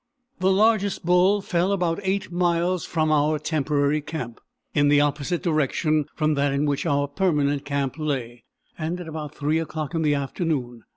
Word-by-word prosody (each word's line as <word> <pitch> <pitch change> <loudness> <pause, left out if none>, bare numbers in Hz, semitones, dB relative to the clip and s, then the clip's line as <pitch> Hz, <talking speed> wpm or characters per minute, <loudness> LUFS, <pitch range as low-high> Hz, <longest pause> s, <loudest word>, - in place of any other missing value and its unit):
The 185 +1 +2
largest 205 -2 +2
bull 180 +4 +4
fell 180 +1 0
about 180 -3 0
8 195 -1 -2
miles 175 0 +1
from 155 -2 0
our 150 +1 +2
temporary 150 -1 0
camp, 135 -6 -6 0.3
in 145 -1 +3
the 145 0 +5
opposite 145 +4 0
direction 155 -2 +1
from 155 -1 +1
that 140 -1 +1
in 140 +2 +1
which 145 +3 -1
our 145 -1 +1
permanent 145 -3 0
camp 140 0 -2
lay, 125 -6 -3 0.4
and 165 +3 -3
at 175 - -7
about 150 -2 -6
3 150 +2 0
o'clock 155 -1 -4
in 165 - 0
the 150 -2 +2
afternoon. 135 -4 -3
155 Hz, 170 wpm, -24 LUFS, 145-175 Hz, 0.4 s, the